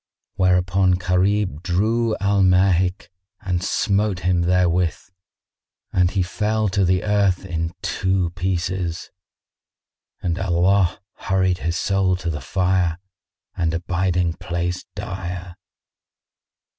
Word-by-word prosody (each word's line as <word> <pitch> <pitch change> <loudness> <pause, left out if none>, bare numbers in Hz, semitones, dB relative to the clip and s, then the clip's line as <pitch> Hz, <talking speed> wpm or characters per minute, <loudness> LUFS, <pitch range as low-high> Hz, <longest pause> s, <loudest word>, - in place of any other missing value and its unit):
Whereupon 90 0 +2
Gharib 90 -1 +1
drew 110 +6 0
Al 100 0 +1
Mahik 90 -1 +2 0.3
and 90 -4 -1
smote 100 -2 0
him 90 0 +1
therewith 90 -1 +2 1.0
and 90 -1 +3
he 95 -1 0
fell 105 +3 -1
to 95 +1 +1
the 90 0 +2
earth 100 -3 +1
in 85 -1 -3
two 90 -1 0
pieces, 90 -1 -3 1.1
and 85 0 -2
Allah 95 0 +2 0.3
hurried 95 -1 +2
his 85 +1 -2
soul 95 -2 +1
to 90 -2 -3
the 75 - -5
fire 90 -3 0 0.6
and 80 -2 0
abiding 90 0 0
place 85 +1 -3
dire. 90 -1 -6
90 Hz, 105 wpm, -22 LUFS, 90-95 Hz, 1.1 s, and